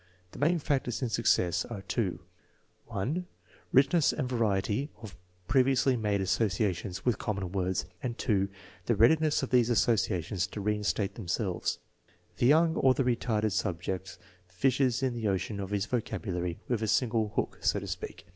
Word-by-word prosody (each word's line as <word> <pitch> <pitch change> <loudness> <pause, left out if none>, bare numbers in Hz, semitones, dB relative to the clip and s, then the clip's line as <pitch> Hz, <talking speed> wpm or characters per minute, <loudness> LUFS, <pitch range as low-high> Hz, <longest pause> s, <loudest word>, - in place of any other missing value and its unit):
The - - -11
main 165 +5 +3
factors 135 -5 -1
in 125 - 0
success 90 -6 +2
are 105 -5 -7
two, 100 -6 -2 0.7
(1) 125 - -2 0.4
richness 140 +4 +4
and 140 -4 -2
variety 110 +2 0
of 110 -6 -10 0.3
previously 130 0 +3
made 105 -4 0
associa 95 0 +1
tions 90 0 -7
with 125 -3 +1
common 100 -4 -3
words; 95 -1 -1 0.2
and 120 -2 -3 0.4
() 95 -2 -21
the 120 - +3
readiness 155 +8 +4
of 135 - -4
these 125 -2 +4
associations 100 -5 +1
to - - -7
reinstate 105 -1 0
themselves. 95 -2 -2 0.6
The 120 - +3
young 160 +3 +4
or 130 -1 +4
the 135 - +1
re 125 -1 +2
tarded 110 -2 0
subject 95 0 -3 0.3
fishes 130 +6 +1
in 130 -2 +1
the 115 -2 -2
ocean 100 +1 -1
of 95 -1 -4
his 100 -1 0
vocabulary 90 -7 -3
with 120 -3 0
a 110 - 0
single 110 -2 +1
hook, - - -2
so - - +2
to - - -7
speak. - - -6
110 Hz, 165 wpm, -30 LUFS, 95-125 Hz, 0.7 s, richness